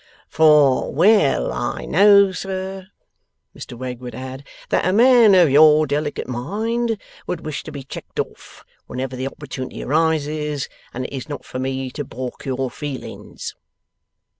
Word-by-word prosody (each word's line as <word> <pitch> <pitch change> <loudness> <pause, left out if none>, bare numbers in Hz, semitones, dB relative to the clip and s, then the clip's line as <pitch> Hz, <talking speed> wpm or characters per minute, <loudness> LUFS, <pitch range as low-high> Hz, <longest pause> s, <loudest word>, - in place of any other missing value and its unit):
'For 150 -4 +4
well 170 - +3
I - - -3
know, 200 +2 +6
sir,' 190 +1 -5 0.7
Mr 120 - -9
Wegg 125 -1 -5
would 125 -2 -8
add, 130 +2 -7 0.3
'that - - +1
a - - +3
man 235 -2 +6
of 175 -6 +5
your 155 +1 +6
delicate 145 +1 -2
mind 220 - -2 0.3
would 175 -2 -4
wish 155 -2 -4
to 155 - -7
be 140 -2 -7
checked 135 - -9
off - - -6 0.2
whenever 130 +1 -4
the 130 +1 -3
opportunity 135 -2 -7
arises, 150 -1 0 0.2
and 130 +1 -5
it - - -7
is 135 +1 -6
not 145 - -6
for 130 - -6
me 130 0 -3
to 145 - -5
baulk 130 -1 -7
your 130 -1 -2
feelings. 145 -3 -7
145 Hz, 150 wpm, -21 LUFS, 130-185 Hz, 0.7 s, know